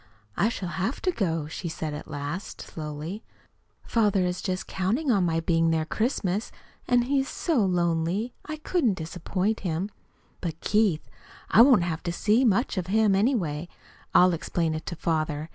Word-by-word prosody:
"I 210 Hz, -, +2 dB
shall 190 Hz, -6 st, -4 dB
have 190 Hz, +9 st, -2 dB
to 370 Hz, -, +2 dB
go," 165 Hz, -, -1 dB
she 170 Hz, +3 st, -5 dB
said 160 Hz, -1 st, -4 dB
at 150 Hz, -, -7 dB
last, 145 Hz, +6 st, -5 dB
slowly. 155 Hz, +6 st, -6 dB, 0.6 s
"Father 205 Hz, -5 st, +2 dB
is 180 Hz, 0 st, -2 dB
just 185 Hz, -1 st, -2 dB
counting 230 Hz, +10 st, 0 dB
on 200 Hz, -5 st, +3 dB
my 165 Hz, -2 st, +1 dB
being 165 Hz, 0 st, +2 dB
there 160 Hz, -1 st, +1 dB
Christmas, 215 Hz, -, -1 dB, 0.4 s
and 245 Hz, -1 st, +4 dB
he 275 Hz, +3 st, +1 dB
is 270 Hz, -, -1 dB
so 310 Hz, -, +1 dB
lonely 175 Hz, +4 st, 0 dB
I 310 Hz, 0 st, -5 dB
couldn't 300 Hz, -, +1 dB
disappoint 185 Hz, +5 st, -2 dB
him. 180 Hz, +3 st, -2 dB, 0.5 s
But, 165 Hz, -3 st, -4 dB
Keith 210 Hz, -7 st, +1 dB, 0.4 s
I 220 Hz, -, +8 dB
won't 245 Hz, -7 st, +7 dB
have 165 Hz, -2 st, -2 dB
to 170 Hz, -, -2 dB
see 215 Hz, +8 st, +2 dB
much 225 Hz, -2 st, +2 dB
of 180 Hz, -, -4 dB
him, 215 Hz, +1 st, +3 dB
anyway. 185 Hz, -, +1 dB, 0.4 s
I'll 180 Hz, 0 st, +6 dB
explain 165 Hz, 0 st, -1 dB
it 155 Hz, -, -5 dB
to 170 Hz, -, -3 dB
father. 155 Hz, -1 st, -1 dB
185 Hz, 170 wpm, -26 LUFS, 165-220 Hz, 0.6 s, I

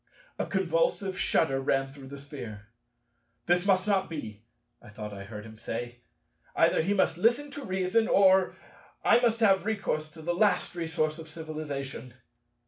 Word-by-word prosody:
A -, -, -1 dB
convulsive -, -, 0 dB
shudder 135 Hz, -7 st, +2 dB
ran 135 Hz, 0 st, 0 dB
through 140 Hz, -2 st, -11 dB
the 140 Hz, +1 st, -8 dB
Sphere. 120 Hz, -7 st, -9 dB, 0.8 s
"This 175 Hz, +2 st, +2 dB
must 190 Hz, 0 st, +3 dB
not 195 Hz, -2 st, +1 dB
be," 110 Hz, -10 st, -6 dB, 0.4 s
I -, -, -14 dB
thought 105 Hz, 0 st, -7 dB
I 100 Hz, -1 st, -8 dB
heard 105 Hz, 0 st, -8 dB
him 110 Hz, 0 st, -12 dB
say: 120 Hz, +2 st, -5 dB, 0.6 s
"either -, -, +4 dB
he 195 Hz, +5 st, 0 dB
must 175 Hz, -3 st, +1 dB
listen 240 Hz, +8 st, +2 dB
to 285 Hz, 0 st, -7 dB
reason, 190 Hz, +1 st, +1 dB
or 190 Hz, -1 st, +5 dB, 0.5 s
I -, -, +6 dB
must 230 Hz, -2 st, +1 dB
have 195 Hz, -3 st, +5 dB
recourse 195 Hz, -8 st, -2 dB
to 160 Hz, -1 st, -11 dB
the 175 Hz, +2 st, 0 dB
last 200 Hz, +3 st, +2 dB
resource 160 Hz, -2 st, -1 dB
of 160 Hz, -, -9 dB
civilization." 150 Hz, -5 st, -6 dB
160 Hz, 160 wpm, -29 LUFS, 135-195 Hz, 0.8 s, I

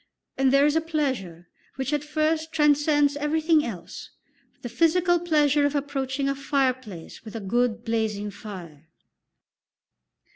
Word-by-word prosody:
And 265 Hz, -1 st, +2 dB
there 275 Hz, +1 st, +5 dB
is 295 Hz, +1 st, +2 dB
a 320 Hz, -, +3 dB
pleasure, 260 Hz, -, -3 dB, 0.3 s
which 265 Hz, +2 st, -3 dB
at 295 Hz, -1 st, 0 dB
first 310 Hz, +1 st, -1 dB
transcends 295 Hz, -1 st, +3 dB
everything 310 Hz, +1 st, +2 dB
else 185 Hz, -, -7 dB, 0.5 s
the -, -, -3 dB
physical 350 Hz, +5 st, +2 dB
pleasure 300 Hz, -4 st, +2 dB
of 285 Hz, 0 st, +1 dB
approaching 275 Hz, -1 st, -2 dB
a 275 Hz, -, +1 dB
fireplace 260 Hz, -, -2 dB
with 220 Hz, -1 st, -10 dB
a -, -, -3 dB
good 235 Hz, +3 st, -1 dB
blazing 215 Hz, -3 st, -1 dB
fire. 175 Hz, -7 st, -10 dB
275 Hz, 135 wpm, -25 LUFS, 225-300 Hz, 0.5 s, there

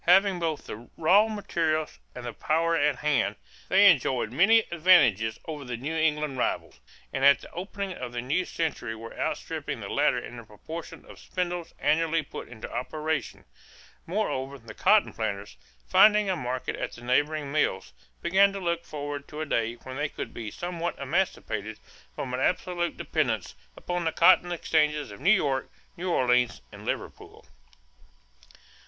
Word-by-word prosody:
Having 190 Hz, +1 st, +5 dB
both 160 Hz, -3 st, -2 dB
the 115 Hz, +3 st, -9 dB
raw 190 Hz, +7 st, +5 dB
materials 165 Hz, -7 st, -1 dB, 0.2 s
and 125 Hz, -1 st, -7 dB
the 120 Hz, -, -4 dB
power 165 Hz, +6 st, +1 dB
at 145 Hz, -2 st, +2 dB
hand, 145 Hz, -1 st, +1 dB, 0.3 s
they 195 Hz, +2 st, +6 dB
enjoyed 130 Hz, -, +3 dB
many 205 Hz, -, +5 dB
advantages 135 Hz, -, +4 dB
over 150 Hz, -3 st, -6 dB
the 125 Hz, -2 st, -5 dB
New 145 Hz, +7 st, -4 dB
England 150 Hz, -4 st, 0 dB
rivals, -, -, -2 dB, 0.3 s
and 135 Hz, -, -2 dB
at 140 Hz, 0 st, +6 dB
the -, -, -13 dB
opening 195 Hz, +2 st, -5 dB
of 125 Hz, -7 st, -6 dB
the 120 Hz, -, -4 dB
new 135 Hz, +9 st, 0 dB
century 140 Hz, -8 st, -3 dB
were 115 Hz, +1 st, -9 dB
outstripping -, -, -3 dB
the -, -, -7 dB
latter -, -, +2 dB
in 120 Hz, -, -7 dB
the 115 Hz, -, -8 dB
proportion 155 Hz, +10 st, -9 dB
of -, -, -13 dB
spindles 175 Hz, -2 st, -4 dB
annually 160 Hz, +2 st, +2 dB
put -, -, -8 dB
into 115 Hz, -2 st, -8 dB
operation. 155 Hz, +5 st, -3 dB, 0.6 s
Moreover, 140 Hz, -8 st, -2 dB
the 115 Hz, -3 st, -12 dB
cotton 215 Hz, -1 st, +3 dB
planters, 100 Hz, -, -4 dB, 0.3 s
finding 210 Hz, -, +6 dB
a -, -, 0 dB
market 125 Hz, -4 st, -3 dB
at -, -, -4 dB
the 120 Hz, -, -11 dB
neighboring 145 Hz, +3 st, +1 dB
mills, 95 Hz, -, 0 dB, 0.3 s
began 195 Hz, +3 st, +5 dB
to 200 Hz, -, -4 dB
look 170 Hz, -2 st, -2 dB
forward 145 Hz, -1 st, -5 dB
to 150 Hz, +1 st, -7 dB
a -, -, -1 dB
day 115 Hz, -5 st, 0 dB
when 130 Hz, +2 st, -9 dB
they 145 Hz, 0 st, -1 dB
would -, -, -5 dB
be 110 Hz, -2 st, -5 dB
somewhat 175 Hz, +5 st, -4 dB
emancipated 120 Hz, -, -2 dB, 0.4 s
from 125 Hz, -2 st, -4 dB
absolute 175 Hz, +6 st, 0 dB
dependence -, -, -1 dB, 0.2 s
upon 175 Hz, -1 st, -3 dB
the 160 Hz, -, +1 dB
cotton 175 Hz, +2 st, +5 dB
exchanges 150 Hz, -3 st, +1 dB
of -, -, -10 dB
New 165 Hz, +8 st, +2 dB
York, 145 Hz, -10 st, +2 dB, 0.3 s
New 180 Hz, +2 st, -4 dB
Orleans, 125 Hz, -6 st, +2 dB
and -, -, -11 dB
Liverpool. -, -, -5 dB
155 Hz, 160 wpm, -27 LUFS, 125-175 Hz, 0.6 s, they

